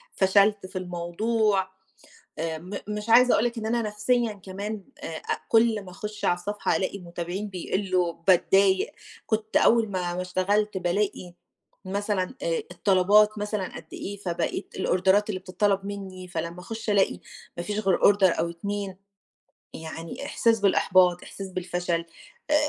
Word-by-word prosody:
فشلت 200 Hz, +1 st, +3 dB
في 185 Hz, -, -7 dB
الموضوع، 190 Hz, +3 st, 0 dB, 0.7 s
آآ 160 Hz, -1 st, -2 dB
م 180 Hz, +5 st, -11 dB, 0.2 s
مش 210 Hz, +1 st, -4 dB
عايزه 250 Hz, +2 st, +7 dB
أقول 220 Hz, -, +3 dB
لِك 240 Hz, 0 st, -2 dB
إن 220 Hz, -, -4 dB
أنا 235 Hz, +1 st, +1 dB
نفسيًا 215 Hz, +2 st, 0 dB
كمان 200 Hz, +2 st, -6 dB, 0.2 s
آآ -, -, -3 dB
أ -, -, -3 dB
كُل 225 Hz, -2 st, +4 dB
ما 185 Hz, -, -11 dB
أخش 210 Hz, +3 st, -6 dB
على -, -, +4 dB
الصفحة 205 Hz, +4 st, -2 dB
ألاقي 195 Hz, +1 st, -2 dB
متابعين 175 Hz, +3 st, -5 dB
بيقلوا 185 Hz, -1 st, -1 dB
باتضايق، 195 Hz, -, +4 dB, 0.3 s
كنت 220 Hz, 0 st, 0 dB
أول 230 Hz, -2 st, +4 dB
ما 180 Hz, -2 st, -2 dB
ما 180 Hz, -, -2 dB
اشتغلت 195 Hz, +3 st, 0 dB
بالاقي 180 Hz, 0 st, -1 dB, 0.5 s
مثلًا 200 Hz, +2 st, -2 dB
آآ -, -, 0 dB
الطلبات 205 Hz, +2 st, +4 dB
مثلًا 210 Hz, -2 st, -3 dB
قد 160 Hz, -, -9 dB
إيه 200 Hz, +1 st, -6 dB
فبقيت 175 Hz, -4 st, -3 dB
الأوردرات 190 Hz, +3 st, +2 dB
اللي 190 Hz, -3 st, -2 dB
بتطلب 195 Hz, +1 st, 0 dB
منّي 190 Hz, -2 st, -7 dB
فلمّا 170 Hz, 0 st, -4 dB
أخش 220 Hz, +4 st, -6 dB
ألاقي 200 Hz, -2 st, +2 dB, 0.4 s
ما 175 Hz, -, -3 dB
فيش 210 Hz, +2 st, -2 dB
غير 195 Hz, -4 st, +2 dB
order 195 Hz, -3 st, +5 dB
أو 170 Hz, -, 0 dB
2، 195 Hz, +2 st, -4 dB, 0.8 s
يعني 165 Hz, +7 st, -7 dB
إحساس 230 Hz, -5 st, +2 dB
بالإحباط، 185 Hz, -2 st, +4 dB
إحساس 195 Hz, -1 st, -8 dB
بالفشل 175 Hz, -2 st, -2 dB, 0.5 s
آآ -, -, +4 dB
195 Hz, 150 wpm, -26 LUFS, 180-210 Hz, 0.8 s, عايزه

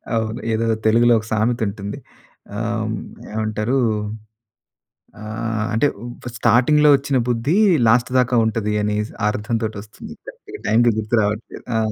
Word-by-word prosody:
అవును, 110 Hz, +2 st, -2 dB
ఏదో 115 Hz, +1 st, 0 dB, 0.2 s
తెలుగులో 120 Hz, +2 st, +5 dB
ఒక 110 Hz, -, -9 dB
సామెత 115 Hz, +2 st, +1 dB
ఉంటుంది. 100 Hz, 0 st, -5 dB, 0.6 s
ఆహ్, 115 Hz, -1 st, -2 dB, 0.4 s
ఏమంటారు? 110 Hz, +4 st, -1 dB, 1.4 s
ఆహ్, 110 Hz, 0 st, -3 dB
అంటే 130 Hz, +6 st, +3 dB, 0.4 s
ఫా 125 Hz, -, -5 dB
స్టార్టింగ్‌లో 150 Hz, +6 st, +4 dB
ఒచ్చిన 140 Hz, -1 st, 0 dB
బుద్ధి 120 Hz, +9 st, +1 dB, 0.3 s
లాస్ట్ 120 Hz, +2 st, +3 dB
దాకా 125 Hz, -1 st, +2 dB
ఉంటది 105 Hz, -1 st, -1 dB
అని‌సి 105 Hz, +1 st, -2 dB, 0.2 s
అర్థంతోటొస్తుంది. 110 Hz, -1 st, -4 dB
కరెక్ట్‌గా 430 Hz, -4 st, -11 dB
టైమ్‌కి 120 Hz, +1 st, +4 dB
గుర్తు 110 Hz, +2 st, 0 dB
రావట్లేదు. 105 Hz, +2 st, -4 dB
ఆ! -, -, +2 dB
115 Hz, 120 wpm, -20 LUFS, 110-120 Hz, 1.4 s, తెలుగులో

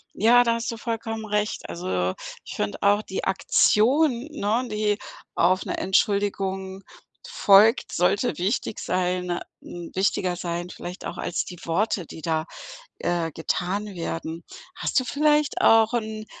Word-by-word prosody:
Ja, 240 Hz, +3 st, +6 dB
da 230 Hz, -1 st, +2 dB
hast 230 Hz, +1 st, -3 dB
du 230 Hz, -, -6 dB
vollkommen 225 Hz, -1 st, -4 dB
recht. 210 Hz, 0 st, -2 dB
Also, 90 Hz, +1 st, -1 dB, 0.3 s
ich -, -, -8 dB
finde 105 Hz, 0 st, -2 dB
auch, 205 Hz, +1 st, +4 dB
die 190 Hz, -3 st, -5 dB
Aktion, 240 Hz, -, +3 dB
ne, 235 Hz, -2 st, -1 dB
die 210 Hz, -1 st, 0 dB, 0.4 s
auf 185 Hz, +2 st, +3 dB
'ne -, -, -3 dB
Entschuldigung 195 Hz, -1 st, 0 dB, 0.4 s
folgt, 225 Hz, -, +4 dB
sollte 180 Hz, +7 st, +1 dB
wichtig 200 Hz, +4 st, -1 dB
sein 180 Hz, -1 st, -1 dB, 0.2 s
hm, 175 Hz, -1 st, -9 dB
wichtiger 185 Hz, -1 st, +1 dB
sein, 175 Hz, 0 st, -4 dB
vielleicht 180 Hz, 0 st, -8 dB
auch -, -, -5 dB
als 175 Hz, -, -2 dB
die 180 Hz, -, -9 dB
Worte, 180 Hz, +2 st, 0 dB
die 160 Hz, -, -10 dB
da, 160 Hz, -1 st, -1 dB, 0.5 s
äh, 170 Hz, -2 st, -1 dB
getan 180 Hz, +6 st, -2 dB
werden. 165 Hz, -1 st, -5 dB, 0.3 s
Hast -, -, +1 dB
du -, -, -4 dB
vielleicht 295 Hz, +2 st, +2 dB
auch 225 Hz, 0 st, +5 dB
'n 220 Hz, -2 st, -3 dB
200 Hz, 145 wpm, -25 LUFS, 175-225 Hz, 0.5 s, Ja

